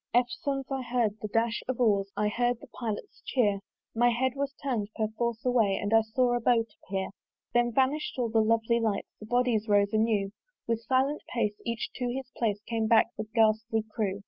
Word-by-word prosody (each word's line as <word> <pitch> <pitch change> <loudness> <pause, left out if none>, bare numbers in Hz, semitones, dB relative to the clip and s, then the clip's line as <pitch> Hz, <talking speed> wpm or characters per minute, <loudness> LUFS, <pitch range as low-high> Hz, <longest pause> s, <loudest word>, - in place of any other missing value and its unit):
Eftsones 270 +3 0
I 270 -1 -1
heard 235 -4 0
the 215 - -3
dash 225 +2 0
of 255 -1 -2
oars, 200 -4 +2
I 210 - +2
heard 240 +2 0
the - - -11
pilot's 235 - -6
cheer: 210 -6 +1 0.3
My 240 +1 +4
head 255 +2 +1
was 280 0 -1
turn'd 235 -7 -1
perforce 225 +2 -2
away 225 -6 +3
And 205 +2 -1
I 225 - +7
saw 240 +3 +1
a 240 - +1
boat 230 -1 +3 0.2
appear. 190 0 -3 0.4
Then 240 0 +3
vanish'd 270 +4 +1
all 240 -2 0
the 220 0 +3
lovely 230 +1 +2
lights; 220 -3 -1
The 215 - -10
bodies 240 -2 +1
rose 205 0 +3
anew: 215 -3 +2 0.4
With 230 -1 0
silent 265 +5 +1
pace, 220 -4 0
each 230 0 -2
to 245 -2 -1
his 260 0 -5
place, 210 -3 0
Came 225 -1 0
back 225 0 +4
the 215 - -4
ghastly 220 0 +3
crew. 200 -3 -1
230 Hz, 195 wpm, -29 LUFS, 215-245 Hz, 0.4 s, I